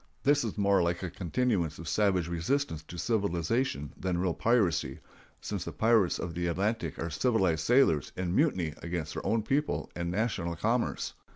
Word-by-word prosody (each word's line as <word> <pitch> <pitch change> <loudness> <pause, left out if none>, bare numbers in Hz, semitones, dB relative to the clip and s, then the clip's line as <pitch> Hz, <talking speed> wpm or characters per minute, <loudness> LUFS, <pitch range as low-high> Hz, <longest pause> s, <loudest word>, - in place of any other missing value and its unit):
This 145 -1 +4
is 110 -3 -4
more 100 -2 +3
like 85 +1 0
a 90 - -3
continuance 95 - -1
of 80 - -8
savage 95 -5 +2
resistance 85 - -1
to 85 +2 -10
civilization 90 - -1
than 90 -1 -2
real 90 -1 0
piracy, 95 - +1 0.4
since - - -3
the - - -4
pirates 110 -5 +3
of 85 - -4
the 85 +1 -2
Atlantic 105 +7 -1
are 80 0 -3
civilized 90 - +1
sailors 120 - +3
in 90 0 -1
mutiny 95 - +2
against 85 -3 -4
their - - -5
own 110 -1 +1
people 145 +6 -1
and 85 0 -2
national 90 -4 -1
commerce. 115 +8 -1
90 Hz, 170 wpm, -30 LUFS, 85-115 Hz, 0.4 s, This